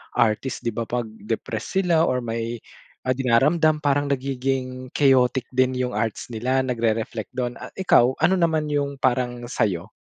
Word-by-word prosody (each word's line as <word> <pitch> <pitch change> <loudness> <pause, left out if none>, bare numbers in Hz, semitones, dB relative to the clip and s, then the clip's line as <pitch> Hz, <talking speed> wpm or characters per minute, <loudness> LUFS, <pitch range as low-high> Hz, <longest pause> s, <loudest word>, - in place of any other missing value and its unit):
artist 120 +2 0
'di 115 - 0
ba 115 -1 -3
'pag 120 -1 -2 0.2
depressed 115 - -2
sila 170 -3 +3
or 125 - +1
may, 115 0 -3 0.4
ah, 130 - 0
dinaramdam, 150 +5 +3
parang 145 0 +2
nagiging 130 -1 -2
chaotic 130 -3 +3
din 130 0 +2
yung 125 0 -1
arts 110 +2 -2
nila, 130 +4 0
nagre-reflect 115 -3 -2
dun. 125 -1 -3
Ah - - -9
ikaw, 130 -9 +4
ano 180 +4 +5
naman 160 -3 +1
yung 140 -1 -1
parang 125 -2 0
sa'yo? 95 -4 -1
130 Hz, 155 wpm, -23 LUFS, 115-140 Hz, 0.4 s, ano